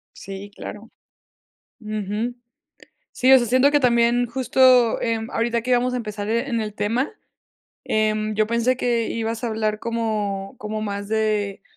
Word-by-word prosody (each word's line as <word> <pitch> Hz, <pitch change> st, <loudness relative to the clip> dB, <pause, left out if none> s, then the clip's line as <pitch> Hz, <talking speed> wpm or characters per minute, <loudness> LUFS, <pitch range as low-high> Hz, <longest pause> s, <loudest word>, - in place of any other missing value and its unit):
Sí, 195 Hz, +1 st, -9 dB
claro. 215 Hz, +3 st, -9 dB, 0.9 s
Ujú. 215 Hz, +2 st, -3 dB, 0.8 s
Sí, 260 Hz, +1 st, +3 dB
o 265 Hz, -, +10 dB
sea, 240 Hz, -, 0 dB
siento 255 Hz, +5 st, +4 dB
que 290 Hz, -, +4 dB
también 240 Hz, -1 st, +3 dB
justo, 255 Hz, -1 st, +4 dB
em, 225 Hz, -1 st, -1 dB
ahorita 235 Hz, 0 st, 0 dB
que 250 Hz, +2 st, -3 dB
íbamos 250 Hz, +1 st, +2 dB
a -, -, 0 dB
empezar, 210 Hz, -3 st, -5 dB
e 235 Hz, +4 st, 0 dB
en 230 Hz, -2 st, 0 dB
el 210 Hz, -1 st, -4 dB
tema, 225 Hz, +7 st, -1 dB, 0.7 s
em, 215 Hz, 0 st, 0 dB
yo 215 Hz, 0 st, +2 dB
pensé 235 Hz, +3 st, +1 dB
que 235 Hz, -2 st, 0 dB
ibas 225 Hz, 0 st, -3 dB
a -, -, 0 dB
hablar 215 Hz, -1 st, -1 dB
como 215 Hz, -4 st, -2 dB
como 215 Hz, 0 st, -4 dB
más 200 Hz, -1 st, -4 dB
de, 215 Hz, -2 st, -1 dB
225 Hz, 160 wpm, -22 LUFS, 215-240 Hz, 0.9 s, o